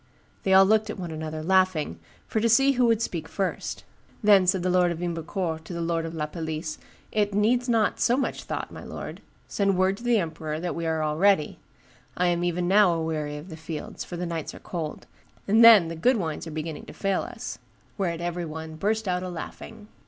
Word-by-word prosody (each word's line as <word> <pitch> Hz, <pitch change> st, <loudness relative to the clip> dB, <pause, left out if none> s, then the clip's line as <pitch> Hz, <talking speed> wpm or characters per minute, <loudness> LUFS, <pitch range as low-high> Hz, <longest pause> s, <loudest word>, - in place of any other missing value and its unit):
They 190 Hz, -, 0 dB
all 190 Hz, 0 st, +8 dB
looked 215 Hz, +1 st, +3 dB
at 215 Hz, -, -4 dB
one 175 Hz, -3 st, -5 dB
another, 155 Hz, 0 st, -5 dB
laughing, 185 Hz, -, +2 dB, 0.3 s
for 220 Hz, -, -1 dB
to 230 Hz, +2 st, +2 dB
see 270 Hz, +5 st, +5 dB
who 250 Hz, -2 st, +3 dB
would 225 Hz, -1 st, +2 dB
speak 165 Hz, -6 st, -4 dB
first. 195 Hz, +1 st, -3 dB, 0.4 s
Then 200 Hz, -3 st, +6 dB
said 185 Hz, -1 st, +2 dB
the 185 Hz, -, +1 dB
lord 180 Hz, -1 st, +3 dB
of 170 Hz, -, -3 dB
Ymbercourt 170 Hz, -1 st, -3 dB
to 175 Hz, -, -7 dB
the 170 Hz, -, -4 dB
lord 165 Hz, -1 st, -1 dB
of 165 Hz, -, -7 dB
La 155 Hz, -1 st, -1 dB
Palisse, 155 Hz, 0 st, -5 dB, 0.3 s
'It 205 Hz, -2 st, 0 dB
needs 240 Hz, +4 st, +2 dB
not 225 Hz, -3 st, +2 dB
so 245 Hz, -, +3 dB
much 275 Hz, -, -2 dB
thought, -, -, -4 dB
my -, -, -9 dB
lord; -, -, -7 dB, 0.3 s
send 195 Hz, -2 st, +1 dB
word 190 Hz, +1 st, +2 dB
to 235 Hz, -, -12 dB
the 240 Hz, -1 st, +3 dB
emperor 160 Hz, -4 st, -3 dB
that 175 Hz, +1 st, -3 dB
we 170 Hz, -1 st, -3 dB
are 160 Hz, -1 st, 0 dB
all 150 Hz, 0 st, -1 dB
ready; 190 Hz, -4 st, +3 dB, 0.6 s
I 180 Hz, 0 st, +3 dB
am 175 Hz, 0 st, 0 dB
even 175 Hz, 0 st, 0 dB
now 200 Hz, 0 st, +5 dB
a 165 Hz, -, -2 dB
weary 150 Hz, -2 st, -3 dB
of 150 Hz, +5 st, -10 dB
the 160 Hz, -, -7 dB
fields, 160 Hz, -1 st, -6 dB
for 175 Hz, -, -7 dB
the 180 Hz, -, -3 dB
nights 165 Hz, -2 st, -4 dB
are -, -, -10 dB
cold; 160 Hz, -4 st, -5 dB, 0.4 s
and 220 Hz, +3 st, +5 dB
then 220 Hz, -7 st, +9 dB
the 165 Hz, -, -5 dB
good 245 Hz, +10 st, +3 dB
wines 165 Hz, -4 st, -3 dB
are -, -, -6 dB
beginning 155 Hz, 0 st, -5 dB
to -, -, -9 dB
fail 195 Hz, -1 st, 0 dB
us;' -, -, -7 dB, 0.4 s
whereat 170 Hz, -4 st, -2 dB
every 175 Hz, 0 st, -2 dB
one 160 Hz, 0 st, -7 dB
burst 215 Hz, +4 st, 0 dB
out 180 Hz, 0 st, 0 dB
a 185 Hz, -, -4 dB
laughing. 180 Hz, +4 st, -8 dB
175 Hz, 225 wpm, -26 LUFS, 160-200 Hz, 0.6 s, then